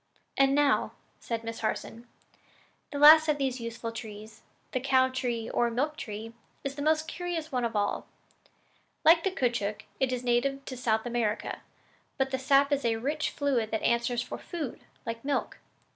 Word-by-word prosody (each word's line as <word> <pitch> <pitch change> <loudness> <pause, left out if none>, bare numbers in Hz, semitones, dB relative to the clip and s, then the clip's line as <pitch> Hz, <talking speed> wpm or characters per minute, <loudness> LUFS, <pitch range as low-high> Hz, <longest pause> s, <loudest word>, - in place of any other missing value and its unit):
"And 275 0 +4
now," 290 -1 +2 0.3
said 230 -1 -4
Miss 230 0 -5
Harson, 230 +1 -3 0.8
"the 285 - -4
last 310 +2 +9
of 300 -1 +2
these 265 -2 -1
useful 230 0 -5
trees 220 -1 -9 0.3
the 255 - 0
cow 260 0 +3
tree, 240 -3 -2
or 240 0 +1
milk 285 +6 -1
tree 220 -2 -7 0.3
is 275 - -3
the 285 - -6
most 310 +1 +2
curious 340 -2 -4
one 250 -2 0
of 230 -1 -2
all. 205 -1 0 1.0
Like 330 +1 +7
the 385 - +2
caoutchouc, 235 - -1 0.2
it 265 -1 +1
is 250 -1 -2
a - - -10
native 270 +3 +1
of 255 - -6
South 220 -2 +1
America; 230 -3 -2 0.6
but 265 0 0
the 265 - -1
sap 275 +2 +4
is 280 -1 +1
a 230 -1 +2
rich 290 +7 -1
fluid 260 -6 0
that 220 - -2
answers 235 +1 +1
for - - -7
food, 320 -8 -5 0.3
like 230 0 -5
milk. 280 0 -2
255 Hz, 175 wpm, -29 LUFS, 230-285 Hz, 1.0 s, last